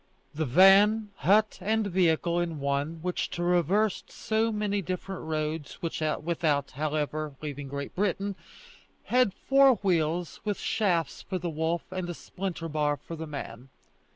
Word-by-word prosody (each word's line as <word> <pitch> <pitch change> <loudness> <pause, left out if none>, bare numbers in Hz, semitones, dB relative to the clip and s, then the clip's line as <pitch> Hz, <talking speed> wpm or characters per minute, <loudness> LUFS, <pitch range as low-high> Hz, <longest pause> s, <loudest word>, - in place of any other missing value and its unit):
The 155 0 -2
van, 200 - +6
hut, 210 +3 +3
and 220 +1 +1
vehicle 175 -2 +2
in 170 -3 -2
one, 140 +4 -2
which 180 0 -1
traversed 180 +4 +1
so 225 0 0
many 210 -1 -1
different 185 +1 -5
roads, 155 -1 -3
without, 155 -2 -1
however, 150 +1 -2
leaving 145 -2 -6
Great 140 +1 -5
Britain, 200 0 -1 0.7
had 250 -4 +3
four 270 +5 +4
wheels, 170 -3 0
with 205 -2 -1
shafts 170 -8 0
for 190 - -4
the 175 -1 -3
wolf 160 +2 -1
and 185 -1 -3
a 175 - -4
splinter 180 -2 -5
bar 150 -2 0
for 165 +4 -8
the 160 0 -6
man. 135 -3 -7
170 Hz, 140 wpm, -28 LUFS, 155-195 Hz, 0.7 s, van